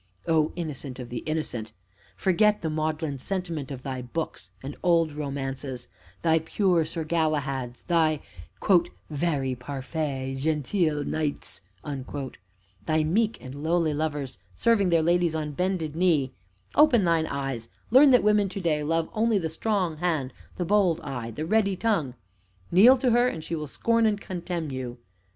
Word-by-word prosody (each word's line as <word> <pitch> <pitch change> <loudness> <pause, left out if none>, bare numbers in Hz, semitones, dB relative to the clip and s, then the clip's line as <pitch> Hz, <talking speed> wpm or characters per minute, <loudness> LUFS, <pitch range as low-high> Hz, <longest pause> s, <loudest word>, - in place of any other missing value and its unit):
O 160 -1 +3
Innocent 145 -6 -5
of 125 -2 -7
the 120 -1 -3
innocent! 125 -8 -3 0.4
Forget 210 +3 +2
the 160 - -1
maudlin 155 -2 -2
sentiment 170 -4 -3
of 130 -2 -7
thy 130 -2 -4
books 140 +7 -4
and 140 +2 -6
old 165 -3 +3
romances 135 -3 -4 0.4
thy 160 -1 +4
pure 170 0 +1
Sir 165 +1 -4
Galahads, 145 -6 -1
thy 160 -3 +2 0.9
"vary 145 -4 0
parfait 135 +1 -4
gentil 155 +1 0
knightes," 140 - -3 1.3
thy 155 -1 +2
meek 210 +8 +1
and 130 0 -8
lowly 165 -1 +2
lovers 145 -3 -3 0.2
serving 225 -5 +3
their 165 -2 +3
ladies 170 -1 +2
on 155 -1 -2
bended 170 -1 -1
knee; 160 -7 +2 0.4
open 280 -8 +5
thine 165 -2 +2
eyes, 135 -5 -4 0.2
learn 270 +4 +8
that 250 -2 +6
women 210 -1 +3
to 195 - -5
day 155 -5 0
love 165 +1 0
only 220 0 +2
the 165 -4 -2
strong 185 -2 -1
hand, 155 -6 -1 0.2
the 180 - -2
bold 185 -3 +3
eye, 125 -6 -5
the 135 +8 -4
ready 200 0 +2
tongue; 175 - 0 0.6
kneel 230 +9 +8
to 250 -1 +2
her, 240 +1 +4
and 160 -10 -3
she - - -5
will 155 -2 -3
scorn 230 +8 +2
and 205 -1 0
contemn 175 -5 -4
you. 130 -2 -5
160 Hz, 150 wpm, -26 LUFS, 140-180 Hz, 1.3 s, learn